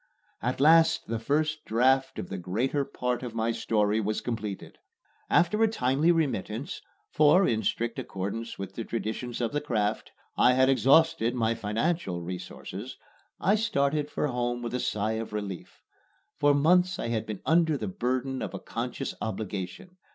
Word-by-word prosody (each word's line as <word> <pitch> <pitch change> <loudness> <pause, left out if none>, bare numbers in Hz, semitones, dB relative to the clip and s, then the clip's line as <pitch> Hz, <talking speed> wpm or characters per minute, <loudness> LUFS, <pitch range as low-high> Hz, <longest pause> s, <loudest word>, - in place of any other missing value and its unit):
At 125 +2 -2
last 160 +3 +5
the 115 0 -3
first 155 +5 0
draft 130 +4 +2
of - - -5
the 95 - -4
greater 120 +11 -1
part 125 -2 -2
of 120 -3 -6
my 115 +1 +1
story 105 -2 +1
was 105 +1 -1
completed. 110 -5 -5 0.5
After 210 +6 +3
a 225 - +6
timely 145 - +2
remittance 145 - -2 0.3
(for, 155 +6 +5
in 110 -1 +1
strict 115 +2 -1
accordance 100 +5 -5
with 95 -1 -6
the 115 - -4
traditions 115 +2 -4
of 115 - 0
the 145 0 -1
craft, 110 -7 -1 0.2
I 125 - +5
had 130 +1 +4
exhausted 135 -1 +4
my 115 -2 +1
financial 110 - -1
resources) 90 +1 -7 0.4
I 195 - +3
started 150 -9 +1
for - - -1
home 120 -2 -2
with 120 - -4
a 125 - 0
sigh 110 -1 -1
of 110 - -8
relief. 100 -4 -6 0.6
For 145 0 +4
months 180 +5 +3
I - - -3
had 110 -1 -2
been 105 -3 -6
under 160 -2 +3
the 110 - -4
burden 130 +6 -2
of - - -4
a - - -5
conscious - - -4
obligation. 105 - -5
120 Hz, 165 wpm, -28 LUFS, 110-145 Hz, 0.6 s, a